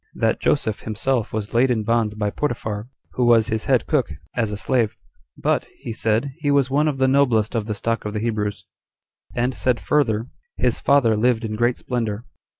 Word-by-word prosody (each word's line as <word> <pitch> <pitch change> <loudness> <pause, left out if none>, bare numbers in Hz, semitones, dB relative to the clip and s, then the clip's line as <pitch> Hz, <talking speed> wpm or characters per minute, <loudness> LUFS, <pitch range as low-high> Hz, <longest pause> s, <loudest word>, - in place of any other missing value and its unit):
That - - +1
Joseph 110 -2 +1
himself 115 +2 -1
was 105 -1 -4
laid 125 +3 +4
in 115 -3 +1
bonds 110 -1 +1
by 105 -1 -1
Potiphar, 110 -6 -3 0.2
who 125 - 0
was 115 -2 +5
his 110 0 -1
head 130 -3 +2
cook, 145 - +1 0.3
as 115 -3 0
a 105 - -3
slave; 115 -1 0 0.4
but, - - 0
he 115 - -6
said, 110 +5 0
he 145 -2 -1
was 140 -2 +3
one 150 +3 +3
of 145 -3 -1
the 130 0 +3
noblest 125 -6 +3
of 110 -3 -1
the 105 - -2
stock 115 +2 -1
of 105 - -4
the 105 - -2
Hebrews; 105 -2 -2 0.7
and 125 +2 0
said 125 -1 0
further, 115 -7 +1 0.3
his 125 -2 +1
father 135 -6 +4
lived 115 +1 +2
in 110 - -3
great 120 +3 +1
splendor. 115 -3 -3
115 Hz, 195 wpm, -22 LUFS, 110-130 Hz, 0.7 s, was